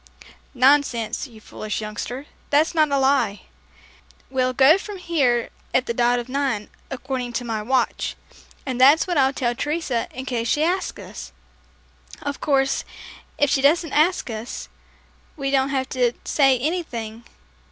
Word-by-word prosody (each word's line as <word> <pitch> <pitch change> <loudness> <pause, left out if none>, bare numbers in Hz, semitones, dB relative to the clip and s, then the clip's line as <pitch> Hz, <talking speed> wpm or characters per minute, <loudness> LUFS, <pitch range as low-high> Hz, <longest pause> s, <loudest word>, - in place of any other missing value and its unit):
"Nonsense, 260 -2 +2
you 225 -4 -15
foolish 215 0 -5
youngster, 220 +5 -5 0.2
that's 300 +4 +3
not 310 -2 +3
a 280 - +3
lie. 265 -7 +2 0.9
We'll 255 -1 +1
go 275 +8 +6
from 415 0 -7
here 275 -10 +1 0.2
at 255 - +3
the 235 - -2
dot 240 +1 +2
of 240 0 -4
nine, 260 -6 -2 0.2
according 255 -2 -4
to 245 - -2
my 225 -2 -2
watch, 250 +2 0 0.5
and 255 -2 -2
that's 285 +5 +7
what 350 -5 0
I'll 265 0 +4
tell 245 -3 -1
Teresa 290 -3 -2
in 260 +1 -7
case 235 -3 -2
she 295 +6 +2
asks 365 +3 -1
us. - - -9 0.9
Of 285 -1 -5
course, 270 -2 +1 0.5
if 290 -1 +2
she 270 - +2
doesn't 315 +2 +3
ask 335 +5 +2
us, 220 +2 -6 0.7
we 275 -2 -2
don't 270 0 +2
have 265 -1 -1
to 245 -2 +1
say 270 -3 +4
anything. 240 -7 -3
265 Hz, 150 wpm, -23 LUFS, 240-290 Hz, 0.9 s, that's